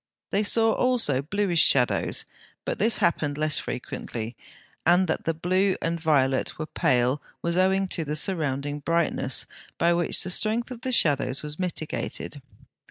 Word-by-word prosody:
They 200 - +2
saw 225 +2 +3
also 235 - +1
bluish 175 +2 +1
shadows, 125 -3 +2 0.4
but - - -3
this 220 +3 +4
happened 150 -4 0
less 155 -1 +2
frequently; 115 -1 -6 0.5
and 175 +3 +4
that - - -2
the 165 - +1
blue 185 +4 +1
and 165 +1 -2
violet 135 -5 +1
were 155 - -4
pale 125 -1 +1 0.2
was 170 0 0
owing 190 +1 +2
to 165 - 0
the 150 0 -3
surrounding 145 -4 0
brightness, 160 -4 0 0.3
by 170 +1 +3
which 170 0 +2
the 185 - -1
strength 230 +6 +1
of 240 -2 -8
the 260 - -3
shadows 145 - +1
was 150 +2 -7
mitigated. 160 -4 -4
165 Hz, 155 wpm, -25 LUFS, 145-190 Hz, 0.5 s, this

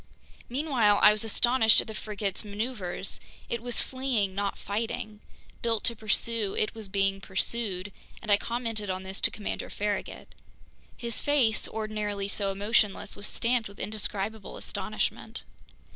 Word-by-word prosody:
Meanwhile 245 -6 +3
I - - +10
was 210 0 +2
astonished 225 +1 +5
at - - +1
the 220 - -7
frigate's 205 -1 -3
maneuvers. 205 -3 -3 0.3
It 235 - -1
was 245 0 +1
fleeing, 255 -7 0
not 200 0 -1
fighting. 215 0 -3 0.4
Built 225 -2 0
to 235 - +3
pursue, 215 -1 0
it 215 - +1
was 220 -3 -8
being 195 0 +1
pursued, 195 -1 -1 0.3
and 215 - -3
I 200 - +8
commented 230 -3 -2
on 185 0 -2
this 190 +1 -6
to - - +5
Commander 210 - -4
Farragut. 205 0 -3 0.6
His 235 -1 -3
face, 265 -7 +3
ordinarily 210 -2 -2
so 200 0 0
emotionless, 205 0 +1
was 200 - -3
stamped 235 -2 +1
with 200 - -14
indescribable 210 0 -3
astonishment. - - -2
215 Hz, 145 wpm, -29 LUFS, 200-230 Hz, 0.6 s, I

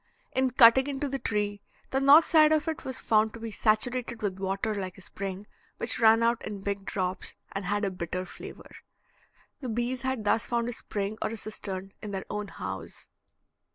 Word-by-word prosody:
In 260 0 +2
cutting 255 +2 +7
into 285 0 -2
the 275 0 -3
tree, 205 -3 -1 0.3
the 265 - +2
north 285 +4 +8
side 310 -1 +6
of 310 +1 +2
it 320 - -3
was 260 -1 -2
found 215 0 +2
to - - -9
be 225 0 -5
saturated 230 +2 0
with 190 -2 -2
water 195 +3 -1
like 190 -2 -5
a - - -12
spring, 195 +1 -5 0.3
which 230 - +1
ran 225 0 +6
out 235 0 +2
in 205 -2 -5
big 200 0 -3
drops, 185 -2 -3 0.2
and 195 -1 -4
had 205 +2 0
a 195 - -1
bitter 185 0 -4
flavor. - - -10 0.9
The 255 - -5
bees 240 +3 -1
had 260 -4 -2
thus 210 +2 +2
found 235 -1 0
a - - -3
spring 205 -1 -4
or - - 0
a 225 - -5
cistern 195 -3 -5
in 210 - -6
their 195 -1 -4
own 210 0 -3
house. - - -7
215 Hz, 195 wpm, -28 LUFS, 195-250 Hz, 0.9 s, north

